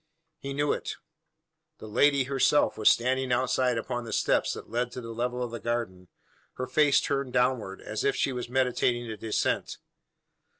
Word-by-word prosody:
He 140 0 -5
knew 145 0 +1
it. - - -4 0.8
The - - -10
lady 140 +6 +3
herself 140 +2 +2
was 110 - +5
standing 130 +2 +1
outside 125 0 +1
upon 120 +1 -3
the 115 - -7
steps - - +1
that - - -9
led 120 +2 -2
to - - -5
the 115 -1 -7
level 125 +2 -2
of 120 - -4
the 115 - -5
garden, 115 -6 -3 0.5
her 130 - -4
face 140 +2 +4
turned 140 -3 -2
downward, 125 -6 0
as - - -4
if 415 0 +2
she 135 - 0
was 125 -1 -5
meditating 125 -1 +1
a - - -4
descent. 110 +1 -1
125 Hz, 175 wpm, -28 LUFS, 115-130 Hz, 0.8 s, was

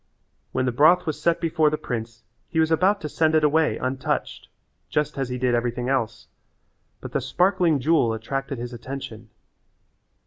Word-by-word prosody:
When 130 - 0
the 125 - +1
broth 155 +9 +5
was 155 -3 -3
set 170 -1 +2
before 160 -2 +2
the 155 - -2
prince 115 -3 -5 0.3
he 165 - -1
was 160 0 +2
about 190 +5 +3
to 150 - -3
send 160 +1 +1
it 155 - +3
away 155 +1 +3
untouched, 130 +1 -3 0.4
just 150 -1 -1
as 135 -2 -2
he 125 - -3
did 125 -1 +1
everything 120 +1 -1
else, 115 -4 -1 0.7
but - - -7
the - - -1
sparkling 180 -5 +2
jewel 140 -4 +2
attracted 135 +5 -4
his 120 +1 -6
attention. 120 -3 -8
135 Hz, 170 wpm, -24 LUFS, 120-160 Hz, 0.7 s, broth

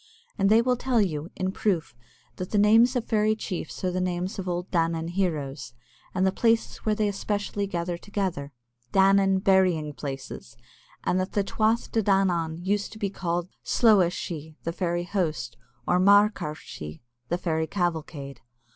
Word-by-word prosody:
And 195 0 +2
they 225 +2 +5
will 250 0 +2
tell 250 -1 +1
you, 165 -5 -1
in 185 0 -1
proof, 180 - -1 0.4
that 185 - -5
the 210 - 0
names 225 +5 +5
of 245 - 0
fairy 215 -1 +2
chiefs 185 -6 -5
are 185 - +1
the 185 +1 -1
names 180 +2 -2
of 185 -1 -3
old 175 +1 -3
Danān 165 -1 0
heroes, 150 -9 -2 0.4
and 185 - +2
the 190 - +3
places 225 +3 +1
where 215 -1 -1
they 210 0 +1
especially 205 0 -2
gather 175 -2 -3
together, 185 -9 -3 0.4
Danān 195 +1 +4
burying 180 -6 +3
places, 135 -4 -7 0.5
and 185 - +1
that 185 +1 -3
the 205 - +2
Tuath 220 +3 0
De 225 - +2
Danān 175 -4 +1
used 205 +1 0
also - - -12
to - - -10
be 200 -2 -2
called 175 -2 -2
the - - -38
slooa 205 -7 +4
shee 170 -2 -4
[sheagh 150 - -12
sidhe] 155 0 -20
(the 165 - -3
fairy 175 -1 -1
host), 175 -4 -2 0.3
or 180 - +3
Marcra 200 -5 +4
shee 75 - -9 0.3
(the 175 - +1
fairy 160 -3 -1
cavalcade). 160 -6 -3
185 Hz, 180 wpm, -26 LUFS, 165-205 Hz, 0.5 s, they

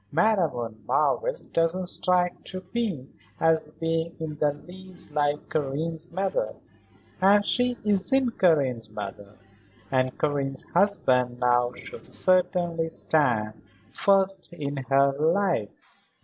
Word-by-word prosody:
"Madame 185 +1 +3
von 115 -4 -6
Marwitz - - +1
doesn't 165 +3 +1
strike 180 0 +1 0.4
me 200 - -2 0.3
as 160 -2 +2
being 165 +1 -1
in 155 -2 -4
the 150 -1 +3
least 180 +2 -10
like 145 0 0
Karen's 155 +3 -3
mother. 195 - -1 0.7
And 205 +2 +5
she 245 -1 +2
isn't 230 +5 +1
Karen's 135 -10 +2
mother. 100 -1 -8 0.5
And 130 -1 +1
Karen's 140 -2 -1
husband, 130 -11 +2
now, 120 0 +2
should - - -9
certainly 175 -3 +1
stand 120 -10 +1 0.3
first 195 -1 +2
in 145 -3 -4
her 140 0 +4
life." 160 - -1
165 Hz, 110 wpm, -26 LUFS, 135-185 Hz, 0.7 s, And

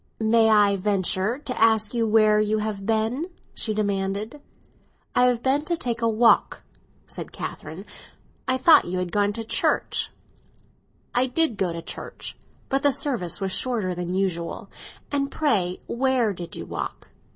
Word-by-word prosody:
"May 220 0 +4
I 205 -2 +4
venture 195 +3 0
to 265 -5 -5
ask 220 -2 +4
where 220 -2 +4
you 215 0 +1
have 210 -2 -3
been?" 225 +8 0 0.3
she 220 - -2
demanded. 205 +5 -2 0.7
"I 250 - +4
have 245 -2 +1
been 275 +3 +2
to 340 +1 -1
take 235 -5 -2
a 230 - +2
walk," 225 +1 +3 0.4
said - - -7
Catherine. - - -7 0.6
"I 260 0 +2
thought 310 +5 +6
you 180 +1 -3
had 180 -1 -2
gone 205 +1 +2
to 225 - -4
church." 225 - 0 1.0
"I 250 +2 +2
did 300 -1 +1
go 190 -3 -1
to 165 0 -6
church; - - -6 0.3
but 270 +1 0
the 285 -1 +3
service 255 - -2
was 195 -1 -2
shorter 220 -5 0
than 180 +1 -4
usual. 180 -3 -2 0.4
And 280 -1 0
pray, 200 - 0
where 250 -4 +1
did 175 -2 -8
you - - -6
walk?" - - -6
220 Hz, 155 wpm, -24 LUFS, 195-250 Hz, 1.0 s, thought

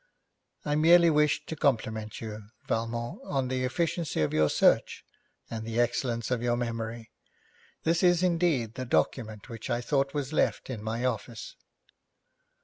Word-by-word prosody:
'I 150 0 +1
merely 170 +2 +6
wished 150 -1 +2
to 160 - -4
compliment 110 -6 -1
you, 105 -2 -7 0.2
Valmont, 115 +1 -2
on 135 -3 -1
the 130 0 -1
efficiency 165 - -1
of 75 - 0
your 75 -1 +3
search, - - +2 0.4
and 110 -1 -5
the 115 +1 -2
excellence 120 0 0
of 125 -2 0
your 120 0 +1
memory. 115 -1 -4 0.7
This 165 +1 +2
is 175 -1 +4
indeed 165 -10 +1
the 130 - -5
document 110 - -1
which 115 -3 -8
I 120 - +1
thought 135 +2 0
was 145 0 -2
left 145 - 0
in 115 -5 -5
my 115 +3 -2
office.' 115 -2 -4
120 Hz, 150 wpm, -28 LUFS, 115-145 Hz, 0.7 s, merely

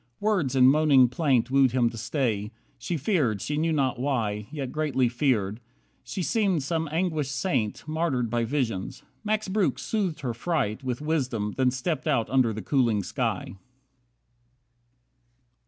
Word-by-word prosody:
Words 190 - 0
in 130 -1 +6
moaning 135 -2 +5
plaint 130 -2 +1
Wooed 135 -2 +4
him 120 -3 +2
to 115 - -9
stay. 115 -4 -1 0.3
She 160 +8 -2
feared, 140 - +1
she 150 - -3
knew 160 +2 +1
not 135 -5 0
why, 110 -6 -1
Yet 140 -4 -5
greatly 145 -5 +1
feared. 115 -5 0 0.4
She 190 - -4
seemed 190 -5 +1
some 160 +1 -2
anguished 160 -4 -1
saint 135 - -2
Martyred 155 -6 0
by 120 +1 0
visions. 115 -6 -2 0.2
Max 215 0 -1
Breuck 195 0 +1
soothed 190 -9 -2
her 125 -4 -2
fright 130 -3 -2
With 125 0 -3
wisdom, 130 -9 -1
then 130 -1 +3
stepped 130 +3 -2
out 115 - +1
under 130 -3 +3
the 110 -1 -6
cooling 115 -5 +1
sky. 95 - -3
135 Hz, 150 wpm, -26 LUFS, 120-155 Hz, 0.4 s, in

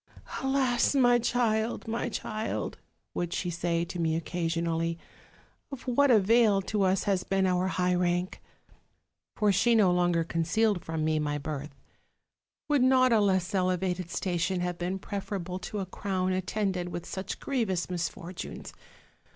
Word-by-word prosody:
'Alas, 265 -1 +2
my 245 -3 +5
child, 230 -2 0
my 230 +2 -2
child!' 215 -1 -4 0.3
would 175 -1 -2
she 175 0 -2
say 170 0 -1
to 180 0 -6
me 160 -1 +1
occasion 165 0 -2
ally, 165 0 0 0.8
'of 275 -3 -7
what 275 +3 +3
avail 220 -1 +5
to 205 +2 -2
us 190 0 +2
has 195 -3 +1
been 195 0 +1
our 180 0 +1
high 180 -1 +1
rank?' 180 0 0 0.9
for 210 -2 +3
she 230 +5 +3
no 200 -5 +5
longer 175 -1 +2
concealed 175 +4 +1
from 160 -1 -2
me 155 0 +1
my 145 -1 -1
birth 145 0 -5 0.9
'would 290 -3 +3
not 255 -1 +5
a 225 - +5
less 190 -1 +1
elevated 185 -1 0
station 180 0 -1
have 180 -1 -3
been 180 +2 -2
preferable 190 -2 -4
to 185 +3 -6
a 195 - -2
crown 185 -1 -2
at 185 0 -2
tended 190 -4 -1
with 175 -1 -5
such 190 0 -5
grievous 220 -10 -1
misfortunes? 175 0 -5
185 Hz, 150 wpm, -29 LUFS, 175-215 Hz, 0.9 s, my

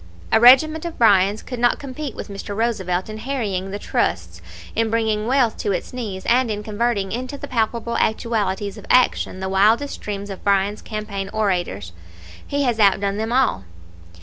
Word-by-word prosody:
A 220 - +5
regiment 285 +7 +6
of 340 -1 -6
Bryans 205 -2 +4
could 250 -2 -6
not 240 0 +3
compete 280 -1 -6
with - - -7
Mr. 200 0 -7
Roosevelt 190 -6 -1
in 215 0 -7
harrying 215 -7 -3
the 200 - -4
trusts, 85 - -2 0.3
in 225 0 +1
bringing 220 -1 0
wealth 250 -3 +2
to 200 - -1
its 190 - -4
knees, 210 -7 -5
and 245 0 +3
in 210 -1 -3
converting 210 -2 -1
into 255 +5 -4
the 285 - -7
palpable 235 -1 -1
actualities 210 -2 -1
of - - -13
action 250 -6 +2
the 190 - -2
wildest 215 +9 +2
dreams 205 -1 -5
of 195 - -9
Bryan's 200 +1 +1
campaign 210 -2 -5
orators. 175 - -1 0.6
He 285 0 0
has 240 -4 0
outdone 200 -1 +3
them 220 +2 -2
all. 250 - +2
215 Hz, 175 wpm, -21 LUFS, 195-240 Hz, 0.6 s, regiment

